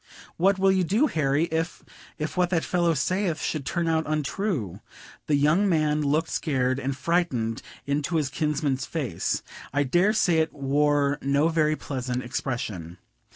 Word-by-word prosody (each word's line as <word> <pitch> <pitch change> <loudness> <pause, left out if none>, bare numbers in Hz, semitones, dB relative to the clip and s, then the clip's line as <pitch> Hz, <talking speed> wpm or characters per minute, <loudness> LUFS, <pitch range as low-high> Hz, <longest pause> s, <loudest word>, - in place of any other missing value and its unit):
"What 195 +3 +3
will 195 0 +4
you 190 -1 +2
do, 210 - +2
Harry, 150 - +1
if 165 +1 -2 0.3
if 155 0 -4
what 180 -1 +2
that 170 -3 +1
fellow 175 -2 +1
saith 185 -1 0
should 150 -4 -3
turn 170 -2 -1
out 160 -1 +1
untrue?" 150 - -2 0.5
The 150 - +3
young 155 +8 +3
man 155 -3 +2
looked 150 +3 +1
scared 130 -4 0
and 135 0 -3
frightened 140 -8 0 0.2
into 145 +4 -1
his 150 -4 +1
kinsman's 145 -3 -1
face; 130 - -2 0.3
I 145 +1 +2
dare 175 +10 +3
say 175 -6 +3
it 160 0 0
wore 145 0 +1
no 140 +3 +2
very 155 -2 +2
pleasant 125 -3 -4
expression. 110 - -4
150 Hz, 155 wpm, -26 LUFS, 135-170 Hz, 0.5 s, will